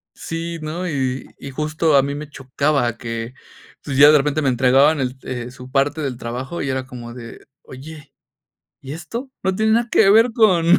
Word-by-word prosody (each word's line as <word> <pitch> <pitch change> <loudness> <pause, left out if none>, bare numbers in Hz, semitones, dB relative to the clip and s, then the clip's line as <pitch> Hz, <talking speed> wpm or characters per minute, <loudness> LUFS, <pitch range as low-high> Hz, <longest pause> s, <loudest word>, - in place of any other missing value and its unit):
Sí, 165 0 -5
¿no? 170 +4 -4
Y 135 -4 -2
y 140 - -8
justo 155 +2 0
a 135 - +5
mí 140 +1 -3
me 150 0 -7
chocaba 135 -3 -1
que, 115 +1 -5 0.5
pues, 135 -3 -4
ya 145 +2 +9
de 150 - +6
repente 150 +2 0
me 135 - +2
entregaban 135 +4 +4
e - - +1 0.2
el 125 -1 -5
su 125 0 -12
parte 145 +3 +1
del 130 -4 -3
trabajo, 125 +8 -5
y 135 - -2
era 130 0 -2
como 120 -2 -9
de: 115 -2 -11 0.2
"Oye, 145 +3 -12 0.7
¿y 135 +1 -7
esto? 230 - -6
No 190 0 0
tiene 220 +1 +2
nada 235 0 +1
que 195 -3 +5
ver 225 +3 +5
con 190 -8 +4
140 Hz, 195 wpm, -20 LUFS, 130-165 Hz, 0.7 s, ya